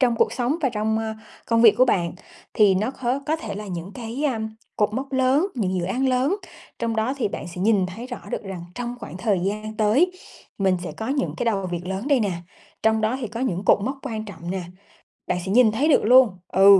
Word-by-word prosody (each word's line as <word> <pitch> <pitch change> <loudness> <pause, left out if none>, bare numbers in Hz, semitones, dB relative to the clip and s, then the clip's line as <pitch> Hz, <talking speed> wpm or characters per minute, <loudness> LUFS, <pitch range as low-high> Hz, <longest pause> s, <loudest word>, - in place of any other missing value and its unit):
trong 245 -3 +3
cuộc 220 - +2
sống 250 +4 0
và 270 - +3
trong, 220 -1 0
a, 220 0 -3 0.3
công 230 0 +3
việc 225 -3 +8
của 255 - +7
bạn 175 -9 +1 0.4
thì 205 -3 +5
nó 210 +6 0
có 260 0 -2
có 315 +1 +1
thể 220 -10 -6
là 210 +1 -6
những 180 0 -6
cái, 245 +4 -4
a, 245 -6 -1 0.4
cột 210 -1 +2
mốc 270 +3 -4
lớn, 265 +6 +3
những 190 -6 -1
dự 175 - -1
án 255 +9 0
lớn. 260 +8 +2 0.4
Trong 230 -1 -1
đó 220 +5 0
thì 255 - 0
bạn - - -6
sẽ 175 +1 -7
nhìn 200 -2 +3
thấy 210 +7 -7
rõ 245 -2 -6
được - - -3
rằng 190 -4 -6
trong 245 +1 -4
khoảng 205 - -7
thời 190 0 +1
gian 215 +3 -3
tới 235 +12 +3 0.5
mình 190 -2 +3
sẽ 165 - -5
có 220 +8 -5
những 275 0 -1
cái - - -2
đầu 200 -5 0
việc 175 -1 -4
lớn 190 +7 -3
đây 280 -4 +4
nè, 205 -4 0 0.5
trong 220 0 +3
đó 220 +4 +1
thì 240 - -2
có 230 +3 -6
những 195 -7 -1
cột - - +5
mốc 270 +3 -3
quan 220 -5 -4
trọng 175 -4 -8
nè, 190 0 -2 0.7
bạn 180 - 0
sẽ 190 - -2
nhìn 230 0 +6
thấy 260 +8 +1
được 295 - +5
luôn. 250 +1 +7 0.2
Ừ, 195 +1 +7
220 Hz, 245 wpm, -23 LUFS, 195-255 Hz, 0.7 s, việc